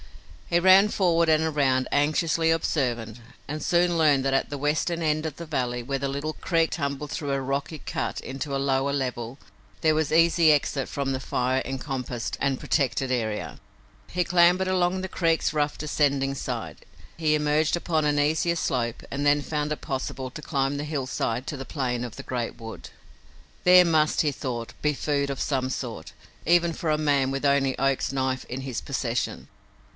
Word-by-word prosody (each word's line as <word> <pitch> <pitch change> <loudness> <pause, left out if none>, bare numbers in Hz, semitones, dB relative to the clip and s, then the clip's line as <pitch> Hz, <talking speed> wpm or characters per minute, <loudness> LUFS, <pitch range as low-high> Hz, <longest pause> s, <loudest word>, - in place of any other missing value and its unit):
He 170 - +3
ran 190 +3 +6
forward 170 -5 +2
and 155 0 +4
around, 135 -4 +1
anxiously 155 +3 +2
observant, 120 -8 -1 0.3
and 150 +2 -4
soon 175 0 +2
learned 145 -4 +3
that 135 - +1
at 135 - +1
the 145 - -4
western 150 +4 0
end 155 0 0
of 155 -2 -4
the 170 - -7
valley, 125 -6 -2
where 135 +3 -3
the 140 +1 -2
little 140 +3 -3
creek 165 -1 0
tumbled 140 -1 -3
through 145 -2 -3
a 135 - 0
rocky 140 +4 -3
cut - - -3
into 140 +2 -5
a - - +1
lower 135 0 +1
level, 125 -3 -3 0.4
there 155 -1 +3
was 155 -2 0
easy 165 0 +5
exit 140 -2 0
from 140 -1 -2
the 130 - -3
fire 130 +1 0
encompassed 130 -3 -4
and 135 -2 +1
protected 135 -1 0
area. 110 -4 -2 0.5
He 180 0 0
clambered 180 +2 +4
along 185 0 +1
the 190 - -3
creek's 165 -4 +1
rough, 150 -1 0
descending 140 -2 +1
side. - - -5 0.4
He 155 -2 +1
emerged 150 +2 +2
upon 160 -2 0
an 150 -1 +2
easier 160 +3 +1
slope 120 -6 -1
and 145 +1 -3
then 145 0 +4
found 150 0 -2
it 150 - -3
possible 130 -1 -4
to 155 - -8
climb 135 -2 -1
the 145 - -3
hillside 130 -4 -2
to - - -3
the 135 - -5
plane 125 -4 -2
of 120 -3 -6
the - - -7
great 120 -2 -4
wood. 115 -1 -9 0.7
There 180 0 +8
must, 155 -2 +3
he 150 - +1
thought, 120 -5 -5
be 150 0 +2
food 140 0 -1
of 140 - -4
some 130 -2 -1
sort, 115 -10 -5 0.3
even 170 0 +3
for 160 - -3
a 155 - +2
man 140 -3 +2
with 135 +1 -2
only 140 -1 +2
Oak's 135 0 +1
knife 130 -1 -1
in 125 +2 -4
his 130 -3 -4
possession! 125 -4 -3
145 Hz, 185 wpm, -26 LUFS, 130-155 Hz, 0.7 s, There